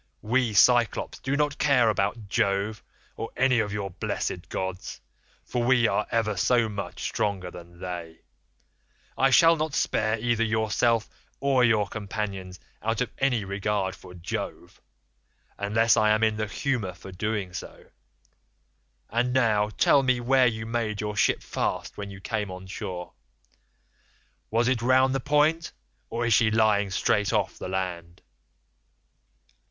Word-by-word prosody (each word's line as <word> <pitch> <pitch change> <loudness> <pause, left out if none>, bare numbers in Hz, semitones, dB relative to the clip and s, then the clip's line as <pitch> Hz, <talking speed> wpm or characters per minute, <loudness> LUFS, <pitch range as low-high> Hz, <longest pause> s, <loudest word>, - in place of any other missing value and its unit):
We 120 0 +1
Cyclopes 120 +1 +3
do 135 +2 -1
not 145 0 0
care 130 -5 +4
about 105 0 -1
Jove 100 +2 0 0.3
or 115 - -5
any 125 -1 +3
of 105 -2 -1
your 100 -2 -4
blessed 90 -1 -4
gods, 95 -1 -4 0.5
for 120 - -2
we 120 -1 +4
are 100 +1 0
ever 110 -2 0
so 120 +4 +2
much 105 -2 -6
stronger 95 -4 -2
than 85 0 -13
they. 85 -3 -7 0.9
I 135 - +3
shall 165 +7 +6
not 155 -2 -2
spare 110 +1 +1
either 115 0 +1
yourself 110 0 +1 0.3
or 135 -2 +2
your 110 -3 +3
companions 100 -3 -5 0.2
out 115 0 -1
of 125 - -1
any 125 -6 +1
regard 100 -1 -2
for 90 - -13
Jove, 85 0 -6 0.8
unless 110 +3 +3
I 110 -2 +3
am 110 +1 +3
in 110 -1 +2
the 110 -1 -2
humour 110 -3 -2
for 90 +3 -11
doing 100 -1 -3
so. - - -9 1.2
And 120 +2 0
now 110 -5 +2
tell 140 +5 +4
me 130 -2 +1
where 130 +1 +4
you 110 -2 -3
made 110 -2 -2
your 105 0 -3
ship 95 - +2
fast - - -3
when 100 -1 -6
you 100 0 -10
came 105 0 -3
on 90 0 -8
shore. 90 -1 -6 1.4
Was 115 +2 +1
it 125 -2 +1
round 130 +2 +4
the 135 - 0
point, 150 +4 +1 0.4
or 120 +1 -2
is 115 - +3
she 110 +1 +4
lying 110 -2 +2
straight 100 +1 +1
off - - -1
the - - -5
land? 90 -2 -4
110 Hz, 150 wpm, -26 LUFS, 100-120 Hz, 1.4 s, shall